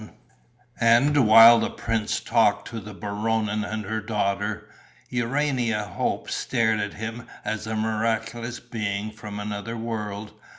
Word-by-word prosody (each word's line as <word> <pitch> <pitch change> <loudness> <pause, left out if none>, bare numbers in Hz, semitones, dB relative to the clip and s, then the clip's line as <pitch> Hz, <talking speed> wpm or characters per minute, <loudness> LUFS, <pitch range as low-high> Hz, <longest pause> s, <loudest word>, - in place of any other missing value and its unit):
And, 120 +3 +4
while 115 +2 +9
the - - 0
prince 115 -2 -2
talked 105 -3 +2
to 115 - -5
the 105 -1 -10
Baronin 105 +1 -1
and 110 +1 -4
her 110 +2 -2
daughter, 105 0 -2 0.4
Urania 125 -3 0
Hope 95 -4 -3
stared 110 -2 +1
at 105 0 -3
him 115 +2 -6 0.2
as 110 0 -3
a 110 - -2
miraculous 115 +2 -2
being 110 -3 -3
from 105 -1 -8
another 105 +2 -4
world. 105 -2 -5
110 Hz, 130 wpm, -25 LUFS, 105-115 Hz, 0.4 s, while